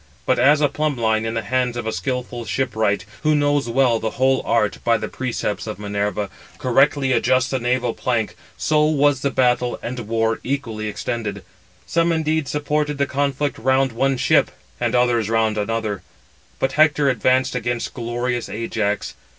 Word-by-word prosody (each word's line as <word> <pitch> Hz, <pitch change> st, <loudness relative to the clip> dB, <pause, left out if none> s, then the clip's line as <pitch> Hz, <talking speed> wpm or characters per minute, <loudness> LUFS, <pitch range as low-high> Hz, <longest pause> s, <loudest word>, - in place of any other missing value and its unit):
But -, -, +2 dB
as 145 Hz, +2 st, +5 dB
a 145 Hz, -, +5 dB
plumb 150 Hz, 0 st, -1 dB
line 110 Hz, -1 st, +1 dB
in 110 Hz, 0 st, -2 dB
the 115 Hz, -, -1 dB
hands 125 Hz, +1 st, 0 dB
of 120 Hz, -, -4 dB
a 110 Hz, -, -1 dB
skilful 120 Hz, +5 st, -3 dB
shipwright 110 Hz, -8 st, 0 dB, 0.2 s
(who 155 Hz, 0 st, +3 dB
knows 145 Hz, -3 st, +1 dB
well 120 Hz, -2 st, +3 dB
the 110 Hz, -, -1 dB
whole 130 Hz, +1 st, +3 dB
art 105 Hz, -3 st, +1 dB
by 115 Hz, -1 st, +3 dB
the 110 Hz, 0 st, -4 dB
precepts 115 Hz, -5 st, -3 dB
of 110 Hz, -, -4 dB
Minerva) 105 Hz, 0 st, -2 dB, 0.3 s
correctly 135 Hz, 0 st, +2 dB
adjusts 130 Hz, 0 st, +2 dB
the 130 Hz, -, 0 dB
naval 125 Hz, +1 st, 0 dB
plank, 115 Hz, -4 st, -1 dB, 0.2 s
so 155 Hz, -1 st, +2 dB
was 145 Hz, -3 st, +3 dB
the 140 Hz, -, +1 dB
battle 125 Hz, -2 st, +1 dB
and 125 Hz, +1 st, -4 dB
war 115 Hz, 0 st, 0 dB
equally 115 Hz, -6 st, -3 dB
extended. 105 Hz, -1 st, -4 dB, 0.4 s
Some 170 Hz, 0 st, +1 dB
indeed 160 Hz, -2 st, 0 dB
supported 150 Hz, +1 st, -1 dB
the 140 Hz, -, +2 dB
conflict 140 Hz, +1 st, -1 dB
round 130 Hz, +2 st, +2 dB
one 135 Hz, +3 st, +1 dB
ship, 130 Hz, +1 st, +3 dB, 0.3 s
and -, -, 0 dB
others 120 Hz, -3 st, +2 dB
round 110 Hz, -1 st, +2 dB
another, 105 Hz, -2 st, -2 dB, 0.6 s
but 135 Hz, -, 0 dB
Hector 150 Hz, -1 st, +3 dB
advanced 130 Hz, +1 st, +2 dB
against 120 Hz, -1 st, -2 dB
glorious 120 Hz, -1 st, -2 dB
Ajax. 105 Hz, -1 st, -2 dB
125 Hz, 165 wpm, -21 LUFS, 110-135 Hz, 0.6 s, as